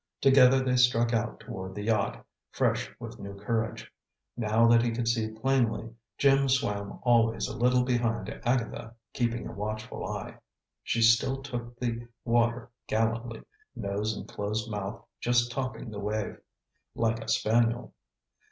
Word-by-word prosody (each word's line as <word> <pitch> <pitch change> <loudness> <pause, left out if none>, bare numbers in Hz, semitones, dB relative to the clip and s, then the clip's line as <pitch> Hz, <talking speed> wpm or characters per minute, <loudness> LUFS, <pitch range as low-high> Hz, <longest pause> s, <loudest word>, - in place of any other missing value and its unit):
Together 135 -1 +6
they 125 -1 +1
struck 120 -1 +4
out 115 0 -1
toward 95 -5 -7
the 105 - -4
yacht, 105 -2 0 0.2
fresh - - 0
with - - -8
new 100 0 -7
courage. 110 +3 -3 0.4
Now 115 0 +3
that 115 0 +6
he 120 - +1
could 115 0 -2
see 115 -1 +1
plainly, 115 0 0 0.3
Jim 135 -1 +4
swam 105 -7 0
always 115 -2 +3
a - - -6
little 125 0 +3
behind 120 -4 0 0.2
Agatha, 115 -2 -1 0.2
keeping 120 -1 -1
a - - -6
watchful 110 +1 -5
eye. - - -6 0.4
She 115 0 0
still 120 +4 +4
took 120 -3 -6
the 120 -1 -3 0.2
water 120 0 +1 0.2
gallantly, 115 +1 -1 0.3
nose 105 +2 -2
and - - -7
closed 105 +2 -3
mouth 105 +1 -5
just 120 0 +2
topping 125 -3 -4
the 105 - -6
wave, 105 +1 -3 0.6
like 115 0 +1
a - - -12
spaniel. 115 +2 +1
115 Hz, 145 wpm, -29 LUFS, 110-120 Hz, 0.6 s, Together